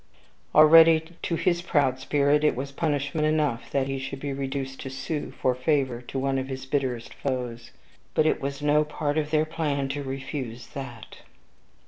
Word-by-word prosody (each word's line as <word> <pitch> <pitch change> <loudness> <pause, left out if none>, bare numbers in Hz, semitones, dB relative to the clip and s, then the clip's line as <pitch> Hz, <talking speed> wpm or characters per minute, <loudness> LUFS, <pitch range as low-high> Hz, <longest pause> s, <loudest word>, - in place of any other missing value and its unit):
Already, 160 +1 +8 0.2
to 170 - -1
his 170 +1 +1
proud 140 -7 +1
spirit, 145 +2 +2
it 150 - +3
was 135 +3 -4
punishment 150 0 0
enough 150 -6 0
that 135 -1 0
he 135 0 -3
should 135 +1 -5
be 140 0 -3
reduced 135 -1 -4
to 135 - -6
sue 145 +3 -4
for 130 - 0
favor 130 -2 0
to 125 +2 -7
one 135 0 0
of 130 - -4
his 130 -1 -6
bitterest 130 -4 -2
foes. 125 -3 -4 0.5
But 155 - +4
it - - +1
was 140 +1 -4
no 150 +1 +4
part 150 0 -1
of 150 -1 -2
their 155 0 +2
plan 145 -4 -2
to 145 +1 -3
refuse 135 -3 -5
THAT. 125 -6 -9
140 Hz, 175 wpm, -26 LUFS, 130-150 Hz, 0.5 s, Already